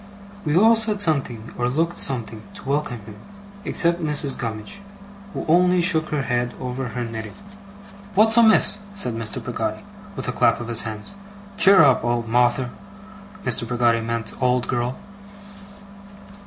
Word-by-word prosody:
We 150 Hz, +2 st, +1 dB
all 225 Hz, +4 st, +6 dB
said 220 Hz, -2 st, +3 dB
something, 135 Hz, -, +1 dB
or 120 Hz, 0 st, 0 dB
looked 165 Hz, +6 st, -1 dB
something, 115 Hz, -4 st, -2 dB
to -, -, -11 dB
welcome 140 Hz, -5 st, -2 dB
him, 105 Hz, 0 st, -13 dB, 0.5 s
except 170 Hz, +1 st, +1 dB
Mrs. 150 Hz, -3 st, +1 dB
Gummidge, 115 Hz, -, -6 dB, 0.5 s
who -, -, -6 dB
only 180 Hz, +2 st, +3 dB
shook 170 Hz, -3 st, +2 dB
her 150 Hz, -2 st, -2 dB
head 120 Hz, -1 st, -2 dB
over 125 Hz, +1 st, -5 dB
her 120 Hz, +1 st, -5 dB
knitting. 110 Hz, -2 st, -7 dB, 0.8 s
'What's 220 Hz, +2 st, +5 dB
amiss?' 220 Hz, -3 st, +5 dB, 0.2 s
said 125 Hz, -, -3 dB
Mr. 115 Hz, -2 st, -5 dB
Peggotty, -, -, -4 dB, 0.3 s
with -, -, -6 dB
a -, -, -1 dB
clap -, -, +2 dB
of 120 Hz, -1 st, -7 dB
his 115 Hz, -1 st, +2 dB
hands. 105 Hz, -, -8 dB, 0.4 s
'Cheer 200 Hz, -1 st, +7 dB
up, 135 Hz, -3 st, +3 dB
old 120 Hz, -1 st, -1 dB
Mawther!' 120 Hz, +2 st, +1 dB, 0.7 s
(Mr. 115 Hz, -, -1 dB
Peggotty 120 Hz, -1 st, +1 dB
meant 115 Hz, -1 st, -4 dB
old 125 Hz, -1 st, +1 dB
girl.) 120 Hz, +1 st, -2 dB
125 Hz, 150 wpm, -22 LUFS, 115-170 Hz, 0.8 s, Cheer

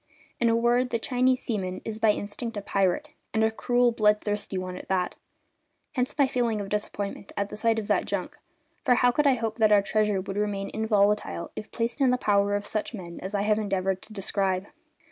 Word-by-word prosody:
In 235 Hz, -, +3 dB
a 230 Hz, -, +3 dB
word, 240 Hz, +2 st, +2 dB
the 235 Hz, -, 0 dB
Chinese 255 Hz, +2 st, +1 dB
seaman 190 Hz, -5 st, -2 dB
is 220 Hz, -1 st, -3 dB
by 225 Hz, -, +4 dB
instinct 210 Hz, +2 st, -2 dB
a -, -, -2 dB
pirate, 195 Hz, +10 st, +1 dB, 0.3 s
and 220 Hz, -, +3 dB
a 220 Hz, -, +3 dB
cruel, 245 Hz, +2 st, +2 dB
bloodthirsty 210 Hz, -2 st, +1 dB
one 185 Hz, 0 st, -4 dB
at -, -, -9 dB
that; 185 Hz, -2 st, 0 dB, 0.8 s
hence 255 Hz, 0 st, -2 dB
my 280 Hz, -, +5 dB
feeling 235 Hz, -4 st, 0 dB
of 200 Hz, -1 st, -5 dB
disappointment 205 Hz, -1 st, -4 dB
at 200 Hz, 0 st, -1 dB
the -, -, -6 dB
sight 225 Hz, +1 st, +1 dB
of 215 Hz, -2 st, -3 dB
that -, -, +2 dB
junk; -, -, -3 dB, 0.4 s
for 250 Hz, -4 st, +4 dB
how 245 Hz, 0 st, +4 dB
could 295 Hz, +4 st, +2 dB
I 270 Hz, -, +5 dB
hope 225 Hz, -2 st, -3 dB
that 215 Hz, -1 st, +5 dB
our 205 Hz, -1 st, +6 dB
treasure 210 Hz, -1 st, +1 dB
would 195 Hz, +1 st, -5 dB
remain 205 Hz, -1 st, -1 dB
inviolate 210 Hz, -1 st, +3 dB, 0.3 s
if 215 Hz, -, -7 dB
placed 235 Hz, +4 st, -2 dB
in 265 Hz, -, +5 dB
the 250 Hz, -, +3 dB
power 205 Hz, -3 st, +2 dB
of 205 Hz, 0 st, -2 dB
such 215 Hz, +3 st, -3 dB
men 170 Hz, -4 st, -8 dB
as 190 Hz, +3 st, -4 dB
I 200 Hz, -, +1 dB
have 210 Hz, 0 st, +2 dB
endeavoured 195 Hz, -2 st, -1 dB
to -, -, -12 dB
describe? 195 Hz, -2 st, -1 dB
210 Hz, 215 wpm, -27 LUFS, 200-235 Hz, 0.8 s, our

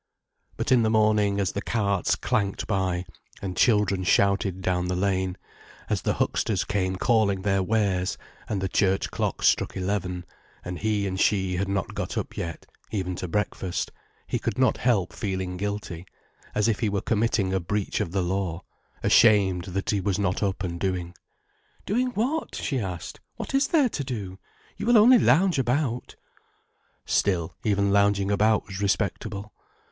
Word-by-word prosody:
But -, -, -2 dB
in 125 Hz, -2 st, +6 dB
the 110 Hz, -, +2 dB
morning, 105 Hz, -2 st, +3 dB
as 95 Hz, -4 st, 0 dB
the 100 Hz, -, -3 dB
carts 100 Hz, -4 st, 0 dB
clanked 110 Hz, -6 st, -1 dB
by, 95 Hz, -3 st, -1 dB, 0.3 s
and 95 Hz, -2 st, -5 dB
children 105 Hz, -3 st, +3 dB
shouted 100 Hz, 0 st, +2 dB
down 90 Hz, -1 st, 0 dB
the 90 Hz, -, -1 dB
lane; 95 Hz, -1 st, 0 dB, 0.5 s
as -, -, +1 dB
the -, -, 0 dB
hucksters 100 Hz, -5 st, 0 dB
came 95 Hz, -2 st, -1 dB
calling 100 Hz, -3 st, +2 dB
their 95 Hz, -1 st, +2 dB
wares, 95 Hz, -2 st, 0 dB, 0.3 s
and 100 Hz, -3 st, -1 dB
the 95 Hz, -, 0 dB
church 95 Hz, 0 st, +1 dB
clock -, -, -2 dB
struck -, -, +2 dB
eleven, 90 Hz, -2 st, -2 dB, 0.4 s
and 90 Hz, 0 st, -5 dB
he 105 Hz, -2 st, 0 dB
and 95 Hz, -1 st, -3 dB
she 95 Hz, -3 st, +2 dB
had 95 Hz, +2 st, -1 dB
not 100 Hz, -1 st, -2 dB
got -, -, -4 dB
up -, -, -4 dB
yet, 85 Hz, -1 st, -5 dB, 0.2 s
even 95 Hz, -4 st, -2 dB
to 90 Hz, -, -4 dB
breakfast, 95 Hz, -1 st, -2 dB, 0.3 s
he -, -, -2 dB
could -, -, -3 dB
not 130 Hz, 0 st, +3 dB
help 105 Hz, -8 st, +1 dB
feeling 95 Hz, -3 st, -3 dB
guilty, 100 Hz, -3 st, -4 dB, 0.5 s
as 105 Hz, +1 st, +2 dB
if 110 Hz, -3 st, +1 dB
he 110 Hz, -, +1 dB
were 100 Hz, -1 st, -1 dB
committing 105 Hz, -4 st, +1 dB
a 95 Hz, -, +2 dB
breach 100 Hz, +3 st, -2 dB
of 85 Hz, -, -3 dB
the 95 Hz, 0 st, 0 dB
law—ashamed 95 Hz, +1 st, +1 dB
that 95 Hz, +1 st, -2 dB
he 100 Hz, -2 st, 0 dB
was 100 Hz, -1 st, 0 dB
not 100 Hz, -2 st, 0 dB
up 100 Hz, -1 st, -1 dB
and 85 Hz, -2 st, -4 dB
doing. 90 Hz, -2 st, -2 dB, 0.7 s
"Doing 245 Hz, +5 st, +1 dB
what?" 270 Hz, +9 st, -1 dB
she 135 Hz, -3 st, -2 dB
asked. 90 Hz, -6 st, -5 dB, 0.2 s
"What -, -, -6 dB
is 275 Hz, +1 st, +3 dB
there 295 Hz, -7 st, +3 dB
to 145 Hz, -, -3 dB
do? 100 Hz, -8 st, -5 dB, 0.4 s
You -, -, -4 dB
will 240 Hz, -1 st, +6 dB
only 240 Hz, +3 st, +7 dB
lounge 180 Hz, -5 st, +4 dB
about." 125 Hz, -1 st, -1 dB, 0.9 s
Still, 90 Hz, -4 st, +1 dB
even 100 Hz, -2 st, +2 dB
lounging 100 Hz, 0 st, +3 dB
about 105 Hz, +1 st, +3 dB
was 95 Hz, 0 st, -7 dB
respectable. 100 Hz, +1 st, -2 dB
100 Hz, 165 wpm, -26 LUFS, 95-110 Hz, 0.9 s, only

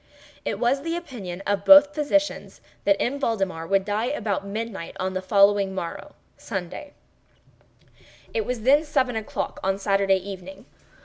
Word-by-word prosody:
It -, -, -2 dB
was 255 Hz, +3 st, +1 dB
the 330 Hz, +3 st, -3 dB
opinion 200 Hz, -, -7 dB
of 200 Hz, -1 st, 0 dB
both 290 Hz, +5 st, +8 dB
physicians 295 Hz, 0 st, -1 dB, 0.3 s
that 300 Hz, -, +3 dB
M. 280 Hz, +4 st, -1 dB
Valdemar 195 Hz, -, -1 dB
would 195 Hz, 0 st, +2 dB
die 210 Hz, +3 st, -1 dB
about 215 Hz, -8 st, -2 dB
midnight 210 Hz, -4 st, -5 dB
on 185 Hz, 0 st, -2 dB
the 200 Hz, +2 st, +3 dB
morrow 170 Hz, -3 st, -6 dB, 0.2 s
(Sunday). 190 Hz, -, -6 dB, 1.4 s
It 455 Hz, -2 st, 0 dB
was 250 Hz, -, -4 dB
then 285 Hz, +5 st, +5 dB
seven 260 Hz, -5 st, 0 dB
o'clock 220 Hz, -1 st, -4 dB
on 195 Hz, 0 st, +1 dB
Saturday 195 Hz, -1 st, +2 dB
evening. 190 Hz, 0 st, -9 dB
205 Hz, 140 wpm, -24 LUFS, 195-275 Hz, 1.4 s, both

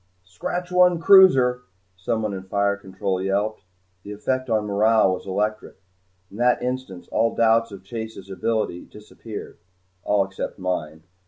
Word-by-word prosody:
"Scratch 175 Hz, -, -5 dB
one 180 Hz, -1 st, +4 dB
cruiser," 135 Hz, -10 st, +6 dB, 0.3 s
someone 105 Hz, +3 st, -2 dB
in 95 Hz, -, -5 dB
fire 100 Hz, +1 st, 0 dB
control 95 Hz, -1 st, -4 dB
yelped. 100 Hz, +3 st, -1 dB, 0.4 s
The 100 Hz, +2 st, -8 dB
effect 130 Hz, +5 st, -2 dB
on 110 Hz, -2 st, +1 dB
morale 105 Hz, -1 st, +3 dB
was 90 Hz, -, -7 dB
electric. 105 Hz, +3 st, -2 dB, 0.6 s
In 100 Hz, -, -11 dB
that 125 Hz, +1 st, +3 dB
instant 125 Hz, -8 st, -5 dB
all 115 Hz, -, +1 dB
doubts 115 Hz, 0 st, +3 dB
of 100 Hz, -2 st, -10 dB
Chase's 110 Hz, -1 st, -7 dB
ability 95 Hz, -1 st, -2 dB
disappeared. 105 Hz, 0 st, -10 dB, 0.4 s
All 100 Hz, -1 st, +2 dB
except 95 Hz, 0 st, -6 dB
mine. 80 Hz, -4 st, -4 dB
105 Hz, 140 wpm, -23 LUFS, 95-115 Hz, 0.6 s, cruiser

